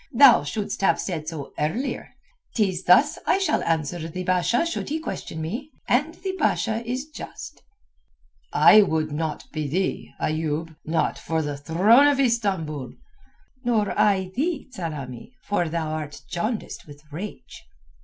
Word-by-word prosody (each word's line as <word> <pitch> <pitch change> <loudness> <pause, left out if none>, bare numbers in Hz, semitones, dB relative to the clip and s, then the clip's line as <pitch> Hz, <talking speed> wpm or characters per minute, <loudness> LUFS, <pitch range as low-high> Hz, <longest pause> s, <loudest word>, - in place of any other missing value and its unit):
Thou 250 - +8
shouldst 200 +8 -3
have 195 - +3
said 160 -5 -3
so 155 -4 -6
earlier. 175 - -2 0.4
'Tis 190 -5 0
thus 295 - +5
I - - +4
shall 390 - +1
answer 165 0 -1
the 180 +3 -5
Basha 185 - +2
should 335 - -3
he 310 - -1
question 235 - -5
me, 225 - -4 0.2
and 300 +7 +2
the 380 +1 -4
Basha 230 -6 +1
is 255 +5 -3
just." 315 +1 -9 0.9
"I 215 - +8
would 160 -5 0
not 155 +1 -3
be 155 -2 -3
thee, 180 +7 -1
Ayoub—not 160 +1 -1
for 160 -1 -1
the 145 -1 -3
throne 190 - +5
of 285 -2 +2
Istambul." 190 - 0 0.7
"Nor 220 -4 +1
I 190 -3 +2
thee, 305 +3 -1
Tsamanni; 150 - -6
for 175 -5 0
thou 160 -1 -2
art 155 -2 -5
jaundiced 215 +3 -3
with 145 0 -13
rage." 190 +8 -8
185 Hz, 145 wpm, -24 LUFS, 155-240 Hz, 0.9 s, Thou